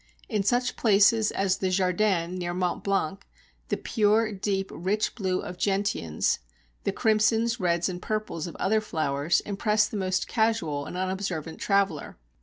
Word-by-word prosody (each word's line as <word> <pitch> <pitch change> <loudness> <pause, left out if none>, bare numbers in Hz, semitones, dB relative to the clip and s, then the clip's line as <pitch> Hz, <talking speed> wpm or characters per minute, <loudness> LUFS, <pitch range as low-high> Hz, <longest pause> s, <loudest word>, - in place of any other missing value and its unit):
In 215 -5 0
such 245 +5 +1
places 215 0 +4
as 195 -1 0
the 190 - 0
"Jardin" 185 -1 +1
near 175 -1 -3
Mont 180 -1 -1
Blanc, 195 -1 -1 0.4
the - - -1
pure, 215 0 +2
deep, 195 -1 -2
rich 195 +5 -1
blue 190 -4 -1
of 180 0 -8
gentians, 195 - 0 0.5
the - - +2
crimsons, 225 +1 +2
reds, 175 -1 +1
and 180 -1 -5
purples 215 -7 -3
of 170 - -8
other 215 +2 +1
flowers, 155 -4 0
impress 210 +1 +1
the 215 - -5
most 185 -1 -1
casual 200 -11 0
and 180 - -6
unobservant 185 -4 -3
traveller. 195 -7 0
195 Hz, 150 wpm, -27 LUFS, 180-215 Hz, 0.5 s, places